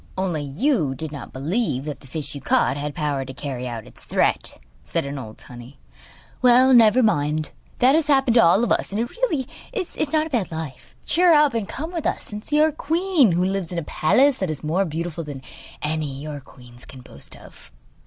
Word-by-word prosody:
'Only 180 -5 -1
you 155 - 0
did 160 +1 -5
not 145 - -8
believe 145 - -2
that 150 -2 -5
the 135 - -15
fish 150 +2 -5
you 140 - -7
caught 255 - +2
had 145 0 -4
power 145 -4 -1
to 130 0 -9
carry 130 -3 -5
out 115 -3 -6
its - - -14
threat,' - - 0 0.2
said - - -3
an 140 0 -5
old 110 -4 -9
tunny. 125 +2 -12 0.6
'Well, 255 +1 +6
never 235 +1 +6
mind, 150 -7 0 0.3
that 255 +2 +5
has 315 -1 +2
happened 270 -4 +3
to 235 - +6
all 185 +7 +5
of 240 - 0
us, - - +1
and 205 - -2
it 235 +1 -2
really 325 - -1 0.2
is 370 - -3
not 310 0 +2
a - - -7
bad 225 -10 -1
life. 160 -5 -7
Cheer 345 +1 +4
up 295 -3 +4
and 225 -4 -2
come 320 +5 -5
with 335 -3 -2
us - - -3
and 210 0 -6
see 300 +3 0
our 310 +1 +4
queen, 320 - +2
who 180 +2 +1
lives 190 -3 -2
in 175 - -4
a 170 - -1
palace 260 - +2
that 190 - -1
is 155 -1 -4
much 150 - -3
more 190 +5 +2
beautiful 165 0 -4
than 140 -3 -8 0.4
any 150 -3 -2
your 150 0 -6
queens 125 -2 -16
can 130 - -12
boast 70 - -11
of. - - -15
170 Hz, 220 wpm, -22 LUFS, -, 0.6 s, Well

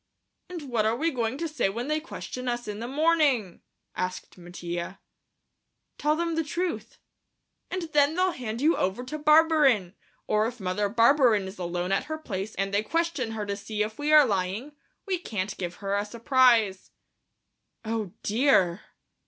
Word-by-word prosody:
"And 350 -4 -6
what 240 -6 0
are 225 - +1
we 325 +7 0
going 240 -1 -2
to 330 +2 -2
say 295 -10 0
when 235 +6 -4
they 305 +1 0
question 255 -5 -7
us 240 -1 -2
in 210 0 -5
the 235 - -4
morning?" 285 - +1 0.3
asked 185 0 -4
Mattia. 175 -1 -6 1.0
"Tell 300 +1 +2
them 335 +1 -1
the 325 0 0
truth." 345 +3 -4 0.7
"And 370 -1 -3
then 295 +1 +4
they'll 370 +1 +2
hand 235 -5 -5
you 315 +4 +4
over 190 +7 -1
to 305 +5 -6
Barberin, 300 - +4 0.3
or 215 +1 +2
if 245 +1 -7
Mother 200 +2 -1
Barberin 235 -2 +4
is 190 0 -10
alone 175 +1 -2
at 195 - +1
her 315 0 -4
place 210 -8 -5
and 195 +1 -2
they 205 - +3
question 310 -3 -1
her 215 -2 -3
to 200 0 -2
see 210 +1 -3
if 215 +3 -6
we 295 +1 0
are 305 -2 +8
lying, 200 +5 -2 0.3
we 380 -3 -1
can't 210 - -4
give 175 -1 -4
her 200 0 -2
a 205 - 0
surprise." 230 -3 +2 1.0
"Oh, 220 -4 -2
dear!" 210 -6 +3
235 Hz, 170 wpm, -27 LUFS, 200-300 Hz, 1.0 s, are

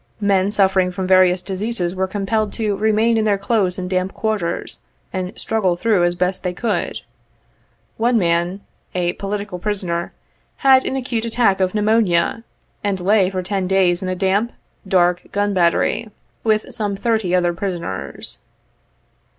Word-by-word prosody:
Men 200 -2 +2
suffering 190 -3 +2
from 185 +1 -3
various 185 -1 +4
diseases 190 -1 -1
were 190 0 -1
compelled 205 +2 -1
to 215 -3 -1
remain 220 +2 +2
in 220 - +1
their 205 -2 +2
close 195 -3 0
and 185 -1 -4
damp 185 +1 -1
quarters, 205 -6 -2 0.3
and 185 -1 -3
struggle 200 -6 +1
through 200 0 +2
as 175 0 0
best 185 +1 -1
they 180 -1 -2
could. 215 +3 -2 1.0
One 235 +1 +2
man, 175 +1 +1 0.3
"a 175 -1 0
political 200 -2 -4
pri 210 +3 0
soner," 175 -3 -2 0.6
had 265 -1 +6
an - - -1
acute 245 -3 -2
attack 225 -4 +2
of 185 +1 0
pneumonia, 210 -2 +2 0.4
and 200 -2 0
lay 190 +1 +3
for 185 -1 -3
ten 190 0 -2
days 185 -2 +2
in 185 - -3
a 185 - -1
damp, 195 +5 0 0.3
dark 180 -1 +2
gun 205 0 0
battery, 180 +5 +1 0.3
with 220 +3 0
some 210 -4 -2
thirty 215 -3 0
other 175 -1 +2
prisoners. 170 - -4
195 Hz, 155 wpm, -20 LUFS, 180-215 Hz, 1.0 s, had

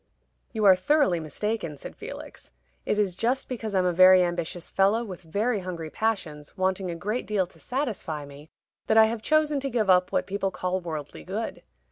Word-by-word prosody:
"You 215 -2 -1
are 190 -2 +8
thoroughly 185 - +2
mistaken," 165 +1 -3
said - - -9
Felix. - - -10 0.4
"It - - +1
is 200 -4 +1
just 245 +7 0
because 220 -5 -4
I'm 185 -1 +3
a 180 - +2
very 185 +1 +7
ambitious 175 0 -3
fellow, 200 +4 +2
with 190 -5 -8
very 205 +7 -1
hungry 170 -4 -6
passions, 175 -9 -3
wanting 185 0 0
a 170 - -3
great 210 +8 -3
deal 205 -3 +1
to 175 - -21
satisfy 215 - -3
me, 145 +2 -13 0.4
that 220 - +3
I 220 - +9
have 225 0 -2
chosen 305 +2 +2
to 275 0 -3
give 220 -6 +2
up 180 0 +3
what - - +1
people 195 0 -1
call 185 0 -2
worldly 155 - -6
good. - - -4
190 Hz, 190 wpm, -26 LUFS, 175-220 Hz, 0.4 s, I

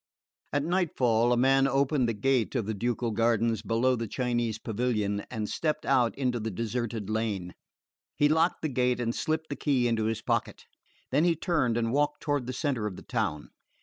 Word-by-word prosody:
At 145 - 0
nightfall 130 -10 +2
a 120 - +3
man 135 +2 +4
opened 135 -1 +2
the 115 - -2
gate 130 +3 +1
of 120 -5 0
the 110 - -2
ducal 120 +2 -1
gardens 115 0 +1
below 125 +3 +1
the 115 -1 -3
Chinese 120 -1 -1
pavilion 105 -3 -1
and 110 -3 -3
stepped 155 +4 -2
out 125 -4 +2
into 125 -3 0
the 110 0 -3
deserted 115 0 -3
lane. 105 -5 -2 0.6
He 145 - +4
locked 160 +3 +2
the 155 - 0
gate 125 -1 +1
and 120 -1 -1
slipped 160 +3 -2
the - - -1
key 130 -5 +1
into 115 -2 0
his 110 0 -2
pocket; - - -2 0.5
then 145 +4 +3
he 170 -1 +3
turned 150 -9 0
and 115 0 0
walked 145 +1 +1
toward 145 -4 -1
the - - -2
centre 130 -5 -1
of 100 - -6
the - - -11
town. 75 -1 -2
120 Hz, 190 wpm, -28 LUFS, 115-135 Hz, 0.6 s, man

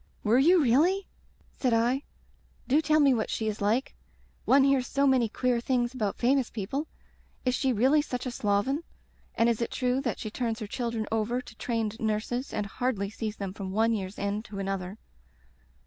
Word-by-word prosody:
"Were 225 +4 +4
you 345 +6 +6
really?" 335 +11 +3 0.5
said 250 -3 0
I. 240 +4 +2 0.7
"Do 285 +4 +4
tell 310 0 +3
me 280 -3 +5
what 225 -3 -1
she 220 - -2
is 215 -1 -3
like. 220 +6 +1 0.5
One 270 +1 +5
hears 270 -2 +3
so 280 0 +1
many 255 -4 +3
queer 250 +2 0
things 240 0 0
about 215 -6 -2
famous 260 0 +2
people. 265 +9 -3 0.6
Is 250 - +2
she 265 +1 +1
really 260 +7 +4
such 250 -3 -4
a 255 - -2
sloven? 220 +8 0 0.5
And 230 - +3
is 235 -1 +1
it 235 - -1
true 250 +1 0
that 245 -5 -2
she 215 - -6
turns 230 -1 -2
her 220 - -5
children 230 0 -3
over 225 +3 0
to 235 - -11
trained 225 -1 -2
nurses 225 +4 -2
and 210 - -2
hardly 200 -2 -2
sees 215 0 -4
them 195 -2 -4
from 195 -2 -6
one 225 +2 +3
year's 195 -2 -4
end 200 +1 -2
to 205 -3 -8
another?" 195 0 -3
235 Hz, 190 wpm, -28 LUFS, 215-260 Hz, 0.7 s, you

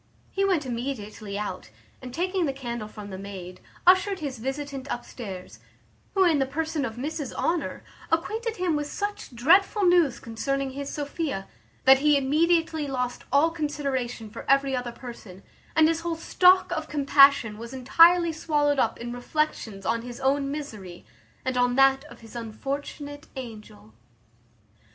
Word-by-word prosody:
He 390 - 0
went 365 -7 +2
immediately 230 -5 -5
out, 190 - -5 0.3
and, 255 - -8
taking 360 +4 0
the 275 - -1
candle 240 -5 -5
from 210 -1 -9
the 190 - -6
maid, 185 -2 -8 0.2
ushered 375 +2 +5
his 280 -8 -5
visitant 270 +2 -4
upstairs, 195 - -7 0.6
who, 385 - +5
in 330 -5 +4
the 270 - +1
person 310 +1 -2
of 225 - -5
Mrs 285 +1 -4
Honour, 340 -1 -1 0.3
acquainted 435 +8 -1
him 355 -3 +1
with 295 0 -2
such 410 -5 -4
dreadful 375 - +4
news 345 -9 +4
concerning 270 +4 -2
his 280 +1 -5
Sophia, 285 - -3 0.4
that 265 0 +8
he 295 0 +4
immediately 320 +2 +2
lost 250 -2 -3
all 290 +5 +4
consideration 275 -7 -3
for 230 - -8
every 275 -1 +3
other 245 -1 -3
person; 235 -6 -11 0.3
and 315 0 +6
his 330 0 +1
whole 335 0 -2
stock 365 +2 +4
of 315 -3 -3
compassion 275 -6 +5
was 230 +1 -8
entirely 330 +6 +5
swallowed 295 -3 +1
up - - +1
in 240 0 -5
reflections 245 -6 -2
on 230 0 0
his 240 0 -8
own 275 +1 +1
misery, 215 -12 -7 0.4
and 260 -1 -1
on 245 0 +2
that 270 +1 +4
of 305 - -14
his 225 +1 -13
unfortunate 285 +6 -5
angel. 215 - -10
275 Hz, 155 wpm, -26 LUFS, 240-315 Hz, 0.6 s, that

